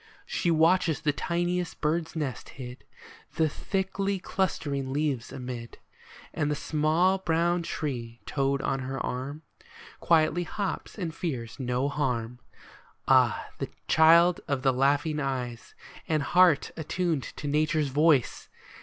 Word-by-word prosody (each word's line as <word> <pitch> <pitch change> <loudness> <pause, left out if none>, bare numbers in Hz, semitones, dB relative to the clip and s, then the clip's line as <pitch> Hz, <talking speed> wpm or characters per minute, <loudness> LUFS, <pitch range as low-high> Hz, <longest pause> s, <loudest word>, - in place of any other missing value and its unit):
She 175 - -1
watches 165 -1 +3
the 150 - +1
tiniest 175 +2 -2
bird's 160 +2 -1
nest 145 -5 -4
hid 125 -1 -9 0.5
The 160 -2 +3
thickly 195 +4 -2
clustering 145 -8 -2
leaves 140 -4 -1
amid; 125 -2 -7 0.6
And 150 -3 0
the 150 - 0
small 160 +6 +2
brown 170 0 +1
tree 120 -8 -4
toad 140 -1 0
on 135 - 0
her 135 0 -4
arm 140 +5 -5 0.6
Quietly 165 +1 +3
hops, 195 +5 -4
and 170 -6 -3
fears 130 -8 -4
no 125 +1 0
harm. 125 -5 -2 0.7
Ah, - - +4 0.4
child 170 +2 +6
of 135 -2 -1
the 135 -2 +4
laughing 145 +4 +1
eyes, 125 -4 -4 0.3
and 155 -3 +1
heart 175 -1 +4
Attuned 165 -1 -1
to 145 - -6
Nature's 150 0 +1
voice 145 -2 +2
150 Hz, 125 wpm, -28 LUFS, 135-170 Hz, 0.7 s, child